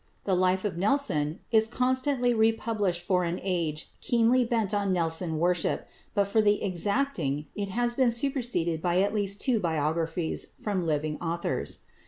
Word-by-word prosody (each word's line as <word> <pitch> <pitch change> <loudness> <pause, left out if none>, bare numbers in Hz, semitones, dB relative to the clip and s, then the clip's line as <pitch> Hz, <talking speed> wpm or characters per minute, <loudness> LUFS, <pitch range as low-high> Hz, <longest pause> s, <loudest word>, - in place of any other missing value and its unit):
The 195 - 0
"Life 185 +2 +2
of 180 -4 -2
Nelson" 190 - +1
is 220 -1 +5
constantly 255 +1 +1
republished 220 -5 0
for 180 -1 +2
an 170 +1 -2
age 170 -5 -2
keenly 240 +2 +3
bent 225 -4 0
on 200 -1 0
Nelson 165 -1 +1
worship, 175 +1 0 0.3
but 200 - +4
for 220 +3 +2
the 205 -1 +2
exacting 185 - -1
it 200 -1 -4
has 240 +4 0
been 255 0 +3
superseded 235 - 0
by 175 +1 +1
at 200 +1 -1
least 200 -1 -1
two 245 -4 +2
biographies 160 0 -1
from 190 -5 -2
living 150 0 -1
authors. 170 0 -3
195 Hz, 155 wpm, -27 LUFS, 170-230 Hz, 0.3 s, is